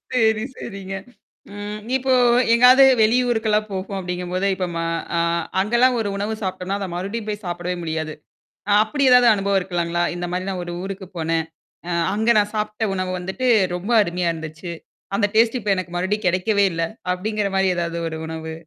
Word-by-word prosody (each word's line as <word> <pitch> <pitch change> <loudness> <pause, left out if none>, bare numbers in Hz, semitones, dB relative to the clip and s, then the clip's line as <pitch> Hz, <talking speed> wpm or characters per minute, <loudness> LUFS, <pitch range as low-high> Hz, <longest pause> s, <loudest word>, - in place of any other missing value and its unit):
சரி, 220 -2 +3
சரிங்க. 195 -1 -7 0.6
ம். 205 +1 -5 0.2
இப்போ 260 0 +1 0.4
எங்காவது 250 +3 +7 0.2
வெளி 220 +3 +4
ஊருக்கெல்லாம் 215 -2 +1
போறோம் 195 +1 -4
அப்படிங்கும்போது, 180 +1 -2
இப்ப 185 - -2
ம - - -2 0.4
அ - - +3 0.4
அங்கல்லாம் 240 +4 +3
ஒரு 205 - -2
உணவு 210 +2 -2
சாப்பிடோம்ன்னா, 190 +1 -3
அத 195 - -3
மறுபடியும் 205 +5 -4
போய் 210 0 -4
சாப்பிடவே 175 +1 -3
முடியாது. 160 -1 -3 0.6
அ - - +2
அப்படி 280 +6 -2
ஏதாவது 250 -1 +7
அனுபவம் 200 -1 +1
இருக்கலாங்களா? 175 -1 -1
இந்த 175 0 -3
மாரி 185 +2 -3
நான் 185 -2 -3
ஒரு 175 - -5
ஊருக்கு 195 -1 -6
போனேன். 160 0 0 0.4
அ - - -3 0.2
அங்க 220 +2 -1
நான் 205 +1 +1
சாப்பிட்ட 215 +1 -1
உணவு 185 -1 -2
வந்துட்டு 190 +8 -2 0.3
ரொம்ப 200 +7 -3
அருமையா 175 -1 -1
இருந்துச்சு. 160 +2 -7 0.4
அந்த 205 0 +2
டேஸ்ட் 230 +2 +4
இப்ப 205 -1 -2
எனக்கு 175 -2 -5
மறுபடியும் 190 +3 -1
கெடைக்கவே 200 +3 +2
இல்ல. 165 0 -2 0.3
அப்படிங்கிற 205 +2 -2
மாரி 190 0 +3
ஏதாவது 170 0 -2
ஒரு 160 - -6
உணவு 160 0 -6
195 Hz, 170 wpm, -21 LUFS, 175-215 Hz, 0.6 s, எங்காவது